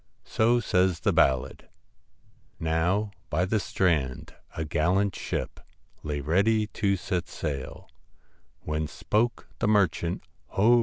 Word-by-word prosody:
So 120 +2 +3
says 90 -5 +1
the - - +2
ballad 65 0 +1 0.9
Now 85 +6 +1 0.2
by 90 +4 +1
the 110 +3 +1
strand 80 -10 0 0.2
a 80 - -1
gallant 90 +5 +1
ship - - -4 0.4
Lay 75 -1 -3
ready 100 +9 +2
to 100 -2 0
set 90 -1 -2
sail, 70 -4 -5 0.7
When 75 0 -2
spoke 115 +9 -1
the 115 - +1
merchant, 90 -5 +1 0.2
' - - -41
Ho 115 +5 +6
90 Hz, 120 wpm, -27 LUFS, 80-105 Hz, 0.9 s, Ho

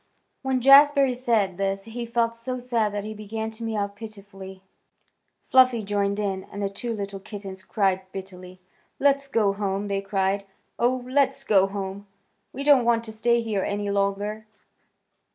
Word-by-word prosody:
When 265 -1 0
Jazbury 275 0 +7
said 225 -7 0
this 195 0 -1
he 235 +1 -6
felt 230 0 +1
so 235 +2 -5
sad 235 -4 0
that 205 -1 -3
he 215 +1 -6
began 220 +1 -5
to 220 +1 -9
mew 215 -3 -1
pitifully. 200 -2 -11 0.8
Fluffy 255 -3 +5
joined 200 0 0
in, 195 -2 -2
and 200 - -9
the 200 -1 -2
two 235 +4 -5
little 200 -1 -5
kittens 195 -1 -8
cried 190 -1 -1
bitterly. 185 -1 -9 0.4
"Let's 280 0 +2
go 215 -7 +2
home!" 200 0 -2
they 195 0 -1
cried. 195 0 -1 0.3
"Oh, 245 +1 +1
let's 275 +1 +1
go 195 -6 +4
home. 195 0 -6 0.4
We 275 - -5
don't 280 -3 +5
want 230 -1 +2
to 225 - -7
stay 235 +2 +2
here 215 -4 -1
any 205 +1 -2
longer." 200 +2 -1
210 Hz, 160 wpm, -25 LUFS, 195-235 Hz, 0.8 s, Jazbury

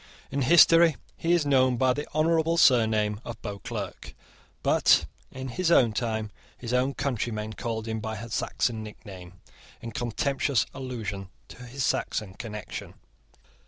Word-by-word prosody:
In 140 +1 -1
history 165 +2 +6 0.2
he 165 - -1
is 170 -4 +2
known 130 -3 +3
by 130 +1 +3
the 145 +3 -5
honourable 165 +1 +2
surname 110 -6 +3
of 115 -2 -7
Beauclerc; 105 -1 -6 0.5
but, - - +4 0.3
in 130 0 -6
his 175 +7 -1
own 120 -9 +5
time, 110 -1 -2 0.3
his 120 0 -5
own 130 +2 +1
countrymen 110 -4 -2
called 110 0 -4
him 110 0 -2
by 110 0 -4
a 115 +3 -7
Saxon 110 0 -1
nickname, 95 -4 -10 0.5
in 115 - -7
contemptuous 120 +2 0
allusion 105 -7 -5 0.2
to - - -12
his 125 +2 -3
Saxon 105 -4 -1
connection. 105 0 -7
120 Hz, 140 wpm, -27 LUFS, 110-135 Hz, 0.5 s, history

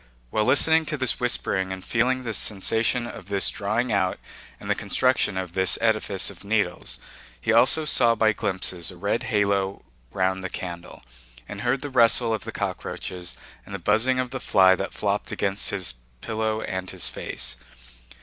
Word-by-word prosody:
While 110 - +1
listening 160 +4 +5
to 150 - 0
this 130 -3 +1
whispering 95 -6 0
and 95 -1 -6
feeling 130 +2 +1
the 115 -2 -3
sensation 110 +4 +1
of 95 -5 -9
this 100 -1 +2
drawing 110 +4 -1
out 95 -3 +1 0.4
and - - -10
the - - +2
construction 130 -6 0
of 90 -2 -4
this 95 0 +3
edifice 110 -4 +1
of - - -13
needles, 100 -4 -1 0.4
he 110 - 0
also 130 +7 +4
saw 120 -5 +3
by 110 0 +3
glimpses 95 -3 -1
a - - -10
red - - -1
halo 100 -1 0 0.3
round 95 0 -1
the 95 - -3
candle, 85 -5 -7 0.4
and - - -7
heard 125 +2 0
the 145 - -5
rustle 115 -2 +4
of 110 - -4
the - - -5
cockroaches 90 -1 -5 0.3
and 100 - -8
the - - -3
buzzing 110 +8 +1
of 125 -1 -2
the 130 - -4
fly 95 -5 +4
that - - -4
flopped - - -2
against 100 +1 0
his 95 -3 -2 0.3
pillow 110 - -2
and 95 0 -4
his - - -3
face. - - -4
105 Hz, 175 wpm, -24 LUFS, 95-120 Hz, 0.4 s, listening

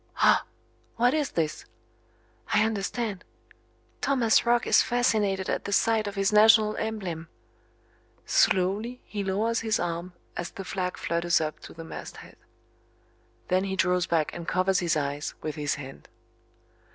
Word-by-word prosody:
Ah! - - +4 0.5
What 245 +3 +3
is 300 -2 0
this? 155 -2 -2 0.9
I 215 0 +4
understand! 215 -1 -3 0.8
Thomas 240 -4 +2
Roch 240 0 +3
is - - +5
fascinated 210 -6 +1
at - - -2
the 200 - -4
sight 220 +1 +2
of 205 - -5
his 195 +1 +1
national 215 0 +6
emblem. 190 -7 -4 1.0
Slowly 215 - +1
he 205 -1 -4
lowers 215 +4 0
his 220 -1 0
arm 175 +1 -3 0.2
as 175 - -4
the 195 - -8
flag 180 -1 -3
flutters 170 +1 +1
up 155 -1 -3
to - - -12
the 165 - -8
mast 160 - -8
head. - - -13 1.1
Then 185 +1 +2
he 190 -1 -2
draws 180 -1 +1
back 160 -3 0
and 170 -1 -7
covers 185 0 +2
his 170 -3 +1
eyes 145 0 -3
with 155 - -3
his 145 -1 -2
hand. 135 -2 -10
195 Hz, 150 wpm, -27 LUFS, 170-220 Hz, 1.1 s, national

